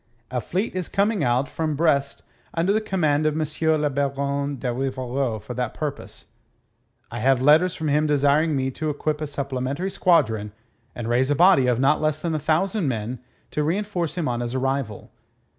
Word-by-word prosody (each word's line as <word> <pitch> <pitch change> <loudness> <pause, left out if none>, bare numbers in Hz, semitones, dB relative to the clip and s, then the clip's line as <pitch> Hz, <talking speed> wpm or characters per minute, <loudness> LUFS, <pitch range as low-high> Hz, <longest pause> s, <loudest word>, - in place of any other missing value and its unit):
A 125 -1 -1
fleet 190 - -2
is 185 -2 -3
coming 200 -3 +1
out 125 +2 +1
from 155 -2 -2
Brest 140 -3 +1 0.3
under 170 +4 +2
the 215 - +1
command 155 -7 +1
of 150 - 0
M. 155 - +1 0.4
le 150 - +2
Baron 140 +1 -1
de 125 0 -2
Rivarol 130 -2 -2
for 110 +4 -8
that 125 -2 -3
purpose. 145 -2 -6 0.8
I 120 - -5
have 130 +2 +3
letters 155 +7 +4
from 160 - -3
him 150 +1 +2
desiring 145 +2 +3
me 130 0 -1
to 155 +4 -3
equip 150 +1 -2
a 155 - -2
supplementary 140 +5 -3
squadron 110 - +2 0.4
and 120 -2 -5
raise 125 +3 +2
a 145 - +2
body 175 -5 +5
of 125 -1 +2
not 140 +4 +3
less 155 0 0
than 170 -2 -1
a 155 - 0
thousand 170 +5 0
men 120 0 -3 0.3
to 150 - -1
reenforce 175 +1 -1
him 175 -4 -1
on 120 -1 -1
his 120 +1 -3
arrival. 135 -5 -2
145 Hz, 185 wpm, -23 LUFS, 130-160 Hz, 0.8 s, body